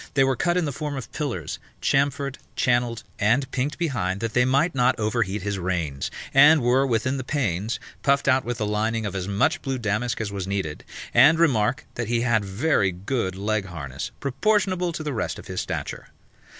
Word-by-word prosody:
They 135 - +5
were 135 0 +2
cut 175 +6 +1
in 180 - +1
the 145 - -2
form 145 +1 -4
of 130 - -7
pillars, 125 - -3 0.2
chamfered, 140 0 0 0.2
channelled 120 -2 +1 0.2
and 120 +7 +3
pinked 140 +3 -2
behind 110 - -1
that 115 0 -3
they 125 0 +4
might 140 +7 +2
not 125 -1 +2
over 110 +2 0
heat 100 -1 -2
his 100 -1 -2
reins: 85 -7 -2 0.2
and 145 +1 +7
were, 130 +3 +3
within 130 +3 0
the 130 - -4
panes, 110 - -1 0.2
puffed 140 0 +2
out 130 -1 +4
with 120 -1 -3
the 110 - -1
lining 110 +2 0
of 100 - -3
as 95 -1 -3
much 105 - +1
blue 135 -1 -2
damask 120 +1 -1
as 110 -2 -3
was 95 -2 -4
needful: 95 -6 -3 0.3
and 140 +7 +7
remark, 125 -7 +2
that 120 -2 -3
he 120 0 +1
had 120 -3 +2
very 100 +1 +1
good 95 +1 -2
leg 105 +1 -1
harness, 75 -6 -6
proportionable 185 +5 +1
to 155 - -5
the 150 -2 -3
rest 115 - -2
of - - -10
his - - -3
stature. - - -5
120 Hz, 200 wpm, -24 LUFS, 100-140 Hz, 0.3 s, and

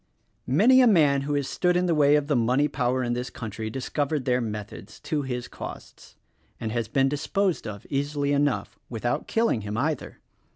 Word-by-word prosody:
Many 230 - +5
a 250 - +6
man 150 -9 +4
who 145 +1 -2
has 140 -2 -1
stood 180 -1 +1
in 180 - +1
the 175 - +2
way 145 -1 +5
of 150 -1 +2
the 145 -1 0
money 125 +5 +2
power 130 -2 0
in 120 -1 -1
this 125 +1 -3
country 110 -1 -6
discovered 140 +3 -2
their 125 -1 +2
methods— 105 -1 -7
to 155 -3 -1
his 125 -2 -4
cost - - -10 0.2
— - - -39
and 110 -2 -3
has 115 -1 -2
been 135 +4 +2
disposed 160 - -1
of 100 -2 -7
easilv 145 0 -1
enough, 145 -1 0
— - - -46
without 120 0 -2
killing 225 - +1
him 105 +1 -4
either. 150 +3 -2
135 Hz, 200 wpm, -26 LUFS, 120-150 Hz, 0.2 s, a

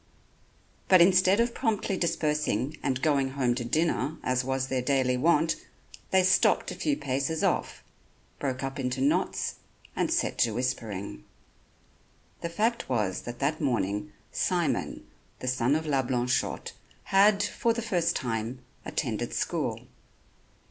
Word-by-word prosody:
But 185 - +7
instead 185 +3 +5
of 235 0 +2
promptly 215 -5 -1
dispersing 150 - 0
and 130 -1 -1
going 140 -3 +2
home 130 -3 +1
to 120 0 -3
dinner 155 +4 0
as 130 0 +1
was 130 0 -1
their 130 -1 -1
daily 130 -1 +1
wont, 160 +4 +2 0.5
they 190 -1 +4
stopped 185 +1 +3
a - - -6
few 295 -2 0
paces 140 +4 -1
off, - - 0 0.6
broke 130 -1 -2
up 135 +1 -4
into 125 0 -2
knots 140 +3 0 0.4
and - - 0
set - - 0
to 115 -3 +2
whispering. 105 - -3 1.2
The 170 - -3
fact 220 - -1
was 105 -7 0
that 120 0 -6
that 150 +5 -1
morning 105 -6 -1 0.2
Simon, 175 -3 -1 0.3
the 130 - -7
son 130 +2 +2
of 160 +1 -1
La 140 -3 +2
Blanchotte, 125 0 -1 0.3
had, 200 +1 +4
for 230 +2 0
the 230 0 -2
first 175 -6 +1
time, 115 0 -2 0.3
attended - - -3
school. - - -1
135 Hz, 140 wpm, -28 LUFS, 125-170 Hz, 1.2 s, But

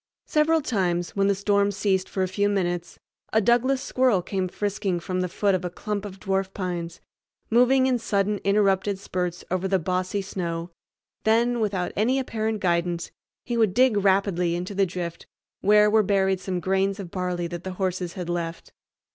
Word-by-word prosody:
Several 315 +1 +2
times, 180 -9 -1
when 195 0 +2
the 200 - +3
storm 200 0 +2
ceased 195 -1 0
for 190 - -1
a - - 0
few 205 +2 0
minutes, 175 -4 -2 0.3
a 220 - +4
Douglas 245 +5 +2
squirrel 250 -8 +2
came 190 -1 -2
frisking 195 -1 -2
from 185 +1 -2
the 180 - -1
foot 200 +2 +1
of 185 -1 0
a 180 - -2
clump 210 +3 -4
of 195 -1 -8
dwarf 195 -1 -1
pines, 175 -3 -4 0.5
moving 250 +3 +5
in 255 -2 +2
sudden 205 -2 0
interrupted 200 -1 +2
spurts 180 -2 -3
over 185 +1 0
the 190 0 +2
bossy 185 +3 -1
snow; 170 -3 -4 0.5
then, 235 +2 +2
without 195 -5 -1
any 240 +6 +2
apparent 220 -4 -2
guidance, 170 -1 0 0.3
he 240 - -2
would 220 -5 +2
dig 255 -3 +4
rapidly 190 -3 +2
into 180 +3 -4
the 195 -1 +2
drift 175 -1 -6 0.3
where 210 +1 +5
were 215 +1 +4
buried 190 -2 +1
some 185 -1 -3
grains 195 +2 0
of 180 -4 -7
barley 180 -2 -2
that 175 0 -6
the 185 - -5
horses 185 -2 -2
had 180 -2 -5
left. 170 -1 -4
195 Hz, 180 wpm, -25 LUFS, 180-210 Hz, 0.5 s, moving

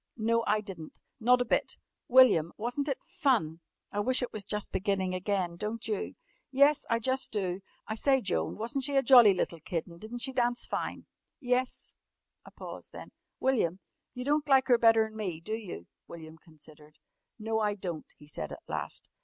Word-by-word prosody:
"No, 230 +1 +1
I 215 0 +2
di'n't. 180 -6 -10 0.2
Not 250 +2 +4
a - - -13
bit!" - - 0 0.3
"William, 240 -11 +6
wasn't 245 +6 -2
it 275 - -3
fun? 240 - 0 0.3
I 205 - -2
wish 255 +5 +3
it 245 - -4
was 210 -2 -4
just 210 0 -2
beginning 190 -1 -1
again, 185 -2 -1
don't 220 +4 -4
you?" 215 -3 -3 0.3
"Yes, 280 +2 +4
I 230 - +3
jus' 260 +3 -1
do. 190 -3 -2 0.3
I 220 - -2
say, 265 +4 +3
Joan, 190 -7 -2
wasn't 235 +5 -2
she 280 +1 -1
a 270 - +4
jolly 240 -6 +8
little 170 -2 -2
kid 165 +1 -3
and 170 -1 -14
di'n't 235 +3 -7
she 265 - -1
dance 240 -1 0
fine?" - - -4 0.3
"Yes," 250 -2 -1 0.5
a - - -13
pause - - -9
then, - - -11 0.3
"William, 215 -9 +1 0.4
you 250 0 -5
don't 295 +1 +1
like 265 -1 +4
her 240 -2 +5
better'n 225 -1 +4
me, 190 -7 -4
do 215 +6 -6
you?" 200 - -6 0.2
William 160 -1 -11
considered. 155 -2 -17 0.4
"No, 220 0 -1
I 210 -1 0
don't," 175 -5 -6
he 150 - -16
said 145 - -6
at - - -9
last. - - -4
220 Hz, 185 wpm, -30 LUFS, 185-250 Hz, 0.5 s, jolly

